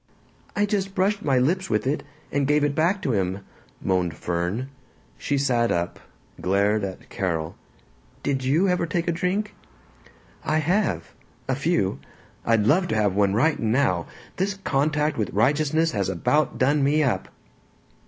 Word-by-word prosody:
"I 205 - +3
just 195 -2 -2
brushed 200 +3 +1
my 135 -3 +2
lips 170 +9 +1
with 105 0 0
it, 140 +4 0 0.3
and 140 -1 +1
gave 150 0 +3
it 145 -1 +1
back 175 +6 +1
to 135 - +1
him," 95 -1 -1 0.4
moaned 90 -3 0
Fern. 90 - -2 0.5
She 140 - -1
sat 125 -4 +2
up, 85 +1 -1 0.4
glared 100 +3 +2
at 95 -1 -6
Carol. 80 -5 -2 0.7
"Did 135 -2 0
you 155 +9 +3
ever 180 -2 +1
take 170 +2 -1
a - - +3
drink?" 185 +5 -1 0.9
"I 155 0 +1
have. 155 - 0 0.3
A 135 - +1
few. 140 - 0 0.5
I'd 115 -2 +3
love 175 - +3
to - - -1
have 105 -3 +2
one 100 0 +2
right 150 +8 +2
now! 110 -7 +1 0.3
This 195 +2 0
contact 150 +1 +1
with 110 - 0
righteousness 155 +8 +2
has - - -1
about 155 +1 +1
done 140 +2 +2
me 150 +3 +3
up!" 115 -9 0
140 Hz, 155 wpm, -24 LUFS, 105-165 Hz, 0.9 s, I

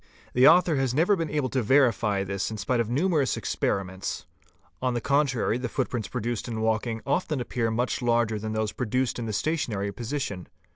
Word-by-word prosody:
The 125 +2 +6
author 165 -1 +5
has 130 -2 0
never 175 +7 +4
been 165 -4 -2
able 145 -3 -1
to 130 - 0
verify 115 -5 +3
this 100 0 -2
in 110 - -5
spite 120 +5 0
of 115 -2 0
numerous 145 0 +1
experiments; 95 -1 -2 0.6
on 125 -1 0
the - - +1
contrary 135 -3 +1
the 125 - -3
footprints 125 -5 -2
prodaced 120 -1 -3
in 115 -2 -4
walking 110 0 0
often 150 0 0
appear 120 -1 -1
much 120 +4 -1
larger 115 -2 +1
than 110 +1 -4
those 110 -1 -1
produced 125 +1 -1
in 115 - -3
the - - -2
stationary 105 -6 -1
position. 115 -5 -4
120 Hz, 185 wpm, -26 LUFS, 110-135 Hz, 0.6 s, The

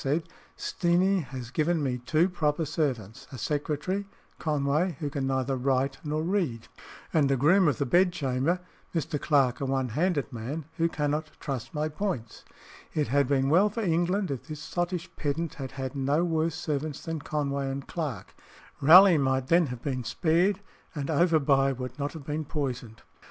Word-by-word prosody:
said, 150 +4 0 0.3
"Steenie 185 +3 +2
has 125 -3 -7
given 160 +2 +1
me 125 -2 -1
two 155 +8 +2
proper 160 -3 0
servants 130 - -2
a 130 - -7
secretary 150 - -2 0.3
(Conway) 150 +2 0
who 145 -2 -3
can 135 -1 -2
neither 130 0 0
write 135 +1 0
nor 155 +1 -1
read, 165 - -1 0.5
and 145 -4 +3
a 135 - +2
groom 175 +8 +5
of 140 -6 +2
the - - 0
bedchamber 175 -1 +2 0.3
(Mr. 155 -2 -1
Clarke, 135 -5 +2
a - - 0
one 135 -1 0
handed 150 +1 0
man) 135 +7 -5
who 165 0 +2
cannot 150 0 -1
truss 135 -5 -4
my 150 0 -1
points." 155 - -4 0.5
It 150 -6 0
had 140 +1 +3
been 135 -1 +2
well 180 +8 +5
for 225 +3 -4
England 175 +1 +1
if 135 +1 -5
this 155 -2 -6
sottish 175 +2 -3
pedant 155 +2 -2
had 130 - -6
had 130 0 -5
no 140 +5 +1
worse 160 -1 0
servants 155 -3 -3
than 165 -1 -3
Conway 140 -2 -2
and 135 0 -5
Clarke. 140 - -4 0.5
Raleigh 175 +3 +8
might 130 -1 0
then 170 -1 +5
have 125 -2 -7
been 130 -3 -2
spared, 180 - +1 0.3
and 145 -1 -3
Overbuy 140 -5 +3
would 125 +1 -6
not 145 +1 -2
have 155 -4 -9
been 150 +1 -2
poisoned. 125 -6 -4
150 Hz, 170 wpm, -28 LUFS, 135-165 Hz, 0.5 s, Raleigh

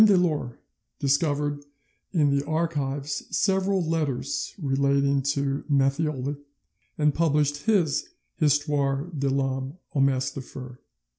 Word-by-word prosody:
Delort 175 - +3 0.4
discovered 145 0 +1 0.5
in 145 -6 +3
the 140 - +1
archives 145 -3 -1
several 190 -2 +1
letters 150 -5 -1
relating 140 -2 +2
to 140 0 -1
Matthioli, 140 0 +1 0.6
and 150 -1 +3
published 150 0 +1
his 180 -10 +2 0.3
Histoire 145 0 +1
de 140 -1 0
l'Homme 135 +2 -1 0.2
au 145 - 0
Masque 135 -1 +2
de 135 - -5
Fer 130 0 -9
(8vo). 125 - -15
145 Hz, 115 wpm, -26 LUFS, 135-155 Hz, 0.6 s, Delort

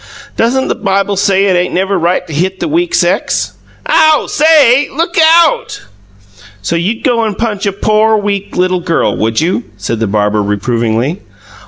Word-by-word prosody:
"Doesn't 260 +3 0
the - - 0
Bible 195 +1 -1
say 195 0 +1
it 190 -2 +2
ain't 175 0 -1
never 190 +2 0
right 175 +1 0
to 160 - -9
hit 185 +5 -2
the - - -2
weak 345 +3 -1
sex?" - - 0 0.3
"Ow! 315 -1 +3
SAY, 290 -4 +3
look 335 +4 -3 0.3
OUT!" 315 - -3 0.8
"So 170 - -1
you'd 195 +7 -2
go 240 -4 +1
and 210 -3 -3
punch 210 -3 -2
a - - +1
pore, 215 +2 +1
weak, 200 -1 -3
little 185 0 +1
girl, 170 -1 -1
would 110 +3 -1
you?" 175 +3 -1
said 110 +3 -4
the 110 - -1
barber, 105 +1 0
reprovingly. 115 - -1
195 Hz, 170 wpm, -12 LUFS, 165-230 Hz, 0.8 s, Ow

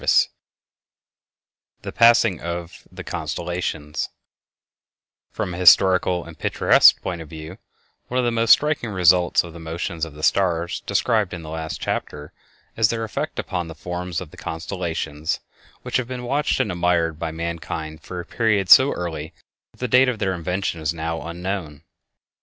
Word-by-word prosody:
IV - - -9 1.8
The - - -5
Passing 115 -6 +5
of 85 0 -6
the - - -9
Constellations 80 -1 -4 1.2
From 90 - -4
a - - -6
historical 90 -1 +5
and 85 -1 -12
picturesque - - +5
point 85 -2 -4
of 80 - -10
view, 80 +3 -9 0.5
one 125 - -3
of 125 - +2
the 120 - +1
most 115 0 0
striking 150 -6 +4
results 90 -2 +4
of 85 -2 -10
the 85 - -10
motions 80 +1 -4
of 80 -3 -4
the 75 - -10
stars 90 -1 +1
described 105 -2 +1
in 85 - -9
the 80 - -8
last 80 -1 -5
chapter 75 +1 -4 0.4
is 110 -2 +3
their 115 -1 -2
effect 110 - -4
upon 90 -2 -3
the 80 - -9
forms 90 +1 -4
of 85 - -9
the - - -15
constellations, 80 -3 -4 0.4
which - - 0
have 130 -2 -2
been 125 -1 -6
watched 140 +5 0
and 105 - 0
admired 85 -2 0
by 80 - -2
mankind 80 -1 -5
from 90 - -8
a 90 - -4
period 105 -5 0
so 135 +2 +9
early 80 -3 -5 0.4
that - - -24
the 125 - 0
date 125 +2 +5
of 125 - -2
their 95 -3 -1
invention 90 -1 -3
is 80 +1 -1
now 80 0 -3
unknown. 85 -3 -5
90 Hz, 165 wpm, -22 LUFS, 80-100 Hz, 1.8 s, so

